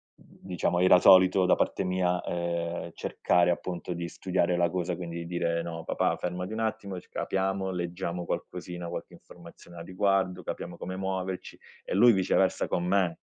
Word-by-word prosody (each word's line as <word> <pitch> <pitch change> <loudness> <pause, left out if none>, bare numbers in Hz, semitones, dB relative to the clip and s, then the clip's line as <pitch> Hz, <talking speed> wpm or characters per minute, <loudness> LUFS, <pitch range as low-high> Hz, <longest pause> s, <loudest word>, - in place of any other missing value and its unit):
diciamo, 90 -1 -3
era 90 0 +7
solito, 95 0 +6
da 90 - +5
parte - - 0
mia, 90 -1 0
ehm, 85 0 -3
cercare, 90 0 +1
appunto, 90 0 -4
di 85 0 -4
studiare 90 -2 0
la 85 -1 +2
cosa, 90 0 -2
quindi 85 -1 -6
dire: 85 -1 -1
"No 80 -1 -6
papà, - - 0
fermati 90 +2 -4
un 110 - -4
attimo 110 -4 -3
e - - -4
c - - -21
capiamo, 95 0 -2
leggiamo 90 0 -4
qualcosina, 90 -1 -5
qualche - - -6
informazione 85 0 -14
a 85 - -7
riguardo, 95 0 0
capiamo - - -5
come 95 +1 -6
muoverci", 95 -1 -4 0.3
e - - -4
lui 120 +4 +7
viceversa 95 -3 +2
con 85 - -1
me, 90 -2 +1
90 Hz, 165 wpm, -28 LUFS, 85-95 Hz, 0.3 s, era